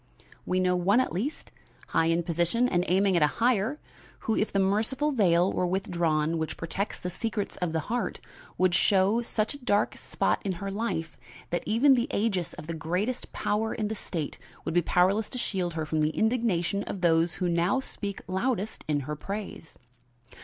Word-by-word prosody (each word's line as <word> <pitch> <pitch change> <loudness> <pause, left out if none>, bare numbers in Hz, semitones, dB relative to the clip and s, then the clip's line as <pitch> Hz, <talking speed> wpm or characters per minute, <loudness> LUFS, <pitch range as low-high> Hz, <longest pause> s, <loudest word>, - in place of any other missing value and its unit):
We 185 0 +1
know 180 0 +2
one 190 +6 +3
at 255 - 0
least, 235 - -3 0.4
high 165 - +2
in 165 +1 +2
position 175 +9 +1
and 180 -6 +1
aiming 190 +1 +3
at 170 - +3
a 150 - +6
higher, 240 +4 +2 0.4
who, 220 - 0
if 210 - 0
the - - 0
merciful 220 +10 +1
veil 185 -7 +3
were 180 - +1
withdrawn 165 -4 0
which 160 - -3
protects 190 +5 -3
the 180 - -4
secrets 210 +2 -3
of 180 -2 -1
the 160 0 0
heart, 235 +9 -2 0.4
would 185 -1 +3
show 195 +5 +3
such 220 -1 -1
a 285 - -9
dark 205 -3 +2
spot - - 0
in 195 -3 -1
her 195 +3 -5
life, 195 -7 -3 0.3
that 175 - 0
even 245 +6 +5
the 240 -2 +1
aegis 195 -6 0
of - - -9
the 165 - -4
greatest 180 +10 -2
power 220 +2 -1
in 210 -2 -2
the - - -1
state 165 -7 -4 0.3
would - - -2
be 175 - +4
powerless 190 +6 +2
to 255 - -5
shield 185 -8 -2
her 160 -1 -2
from 155 +1 -1
the 150 - +3
indignation 220 -5 +1
of 190 - -5
those 165 0 +3
who 180 - -1
now 175 +8 +2
speak 200 -6 -5
loudest 210 +2 -1
in 145 -2 +1
her 150 +3 -4
praise. 195 0 -6
190 Hz, 190 wpm, -28 LUFS, 170-220 Hz, 0.4 s, a